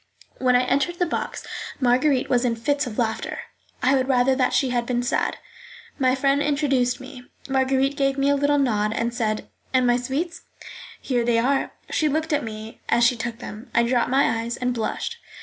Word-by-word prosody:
When 250 Hz, -1 st, +3 dB
I 250 Hz, -, +4 dB
entered 280 Hz, +7 st, 0 dB
the 355 Hz, -, +2 dB
box 330 Hz, -, -4 dB, 0.3 s
Marguerite 255 Hz, +1 st, +2 dB
was 245 Hz, -1 st, +2 dB
in 240 Hz, -2 st, +1 dB
fits 285 Hz, +4 st, 0 dB
of 215 Hz, -, -7 dB
laughter. 225 Hz, -2 st, -2 dB, 0.4 s
I 260 Hz, +2 st, +4 dB
would 260 Hz, -1 st, +2 dB
rather 260 Hz, 0 st, +3 dB
that 255 Hz, -1 st, +2 dB
she 265 Hz, -3 st, +1 dB
had 240 Hz, -1 st, -1 dB
been 245 Hz, -1 st, 0 dB
sad. 245 Hz, -, 0 dB, 0.6 s
My 255 Hz, -1 st, +3 dB
friend 275 Hz, +1 st, +2 dB
introduced 275 Hz, -4 st, +1 dB
me; 250 Hz, -2 st, -11 dB, 0.2 s
Marguerite 270 Hz, +1 st, +1 dB
gave 275 Hz, -1 st, +1 dB
me 275 Hz, +1 st, +2 dB
a -, -, +3 dB
little 285 Hz, +1 st, +2 dB
nod, 215 Hz, -6 st, +1 dB
and 235 Hz, +1 st, -1 dB
said, 215 Hz, -3 st, -2 dB, 0.3 s
"And 255 Hz, -1 st, +4 dB
my 245 Hz, 0 st, +4 dB
sweets?" 290 Hz, +8 st, -3 dB, 0.6 s
"Here 245 Hz, -3 st, 0 dB
they 235 Hz, -1 st, +2 dB
are." 270 Hz, +4 st, +1 dB, 0.2 s
She 310 Hz, -, +2 dB
looked 315 Hz, +2 st, -1 dB
at 295 Hz, -1 st, +1 dB
me 220 Hz, 0 st, -8 dB
as 235 Hz, -, +3 dB
she 240 Hz, +1 st, +4 dB
took 230 Hz, 0 st, -4 dB
them. 225 Hz, 0 st, -9 dB
I 235 Hz, -, +5 dB
dropped 240 Hz, +1 st, +1 dB
my 255 Hz, -3 st, +2 dB
eyes 235 Hz, +1 st, -4 dB
and 250 Hz, 0 st, -1 dB
blushed. 245 Hz, -, -3 dB
255 Hz, 200 wpm, -23 LUFS, 240-275 Hz, 0.6 s, I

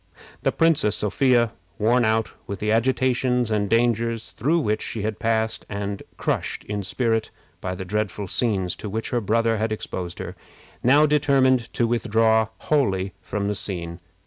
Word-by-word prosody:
The -, -, +2 dB
Princess 160 Hz, -10 st, +3 dB
Sophia, 120 Hz, +1 st, +2 dB, 0.3 s
worn 120 Hz, +3 st, +3 dB
out 110 Hz, 0 st, +1 dB
with 100 Hz, -, -4 dB
the 105 Hz, +3 st, -1 dB
agitations 125 Hz, 0 st, +1 dB
and 105 Hz, -2 st, +1 dB
dangers 115 Hz, -1 st, +1 dB
through 160 Hz, +6 st, +1 dB
which 105 Hz, -5 st, 0 dB
she 110 Hz, -, -4 dB
had 110 Hz, 0 st, -2 dB
passed, 110 Hz, -1 st, 0 dB
and 100 Hz, -1 st, -4 dB, 0.2 s
crushed -, -, -2 dB
in 105 Hz, 0 st, -3 dB
spirit 110 Hz, +2 st, 0 dB, 0.3 s
by 90 Hz, 0 st, -3 dB
the 95 Hz, -, -6 dB
dreadful 105 Hz, 0 st, -2 dB
scenes 95 Hz, -3 st, 0 dB
to 105 Hz, -, -6 dB
which 110 Hz, +3 st, -3 dB
her 120 Hz, -, +1 dB
brother 115 Hz, +2 st, +1 dB
had 110 Hz, +1 st, -1 dB
exposed 90 Hz, -4 st, -4 dB
her, -, -, -6 dB, 0.5 s
now 145 Hz, +5 st, +5 dB
determined 135 Hz, -4 st, +3 dB
to 120 Hz, -, +1 dB
withdraw 110 Hz, -1 st, +2 dB
wholly 100 Hz, -10 st, 0 dB
from 100 Hz, 0 st, -3 dB
the 105 Hz, -, 0 dB
scene. 85 Hz, -4 st, -5 dB
110 Hz, 160 wpm, -24 LUFS, 105-120 Hz, 0.5 s, now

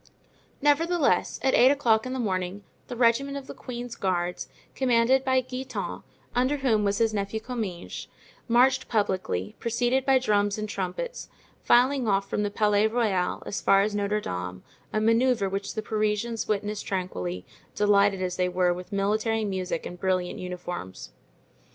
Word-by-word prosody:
Nevertheless, 320 Hz, +2 st, +2 dB
at 265 Hz, -, +3 dB
eight 250 Hz, +2 st, +7 dB
o'clock 245 Hz, -5 st, +2 dB
in 255 Hz, -, -4 dB
the -, -, -3 dB
morning 190 Hz, -3 st, -2 dB, 0.2 s
the 245 Hz, -, -6 dB
regiment 255 Hz, +4 st, +2 dB
of 275 Hz, -, -7 dB
the -, -, -8 dB
queen's 245 Hz, -1 st, -7 dB
guards, 180 Hz, -2 st, -2 dB, 0.2 s
commanded 255 Hz, 0 st, +3 dB
by 260 Hz, -1 st, +3 dB
Guitant, 255 Hz, +1 st, -5 dB, 0.3 s
under 255 Hz, +4 st, +1 dB
whom 235 Hz, -6 st, +2 dB
was 200 Hz, 0 st, +1 dB
his 225 Hz, -1 st, +2 dB
nephew 200 Hz, +1 st, -2 dB
Comminges, 220 Hz, -7 st, -5 dB, 0.4 s
marched 260 Hz, +2 st, +3 dB
publicly, 185 Hz, -, -1 dB
preceded 240 Hz, +3 st, +1 dB
by 270 Hz, -1 st, +4 dB
drums 205 Hz, -5 st, +1 dB
and 215 Hz, 0 st, -3 dB
trumpets, 200 Hz, -, -4 dB, 0.3 s
filing 255 Hz, +1 st, +4 dB
off 195 Hz, -1 st, +1 dB
from 210 Hz, -, -1 dB
the 205 Hz, -, 0 dB
Palais 210 Hz, 0 st, +2 dB
Royal 215 Hz, -6 st, 0 dB
as -, -, -4 dB
far 195 Hz, 0 st, +5 dB
as 210 Hz, 0 st, -1 dB
Notre 205 Hz, +1 st, 0 dB
Dame, 90 Hz, -, -5 dB, 0.3 s
a 215 Hz, -, 0 dB
manoeuvre 230 Hz, -1 st, +3 dB
which 200 Hz, +3 st, -3 dB
the 220 Hz, -, -3 dB
Parisians 215 Hz, +1 st, -1 dB
witnessed 210 Hz, 0 st, -2 dB
tranquilly, 90 Hz, -, -3 dB, 0.3 s
delighted 200 Hz, -2 st, +3 dB
as 180 Hz, -1 st, -2 dB
they 180 Hz, 0 st, +1 dB
were 180 Hz, 0 st, +2 dB
with 180 Hz, +3 st, -9 dB
military 215 Hz, +2 st, 0 dB
music 185 Hz, -4 st, -3 dB
and 180 Hz, -, -7 dB
brilliant 185 Hz, -1 st, -1 dB
uniforms. 180 Hz, -, -6 dB
215 Hz, 155 wpm, -26 LUFS, 190-245 Hz, 0.4 s, eight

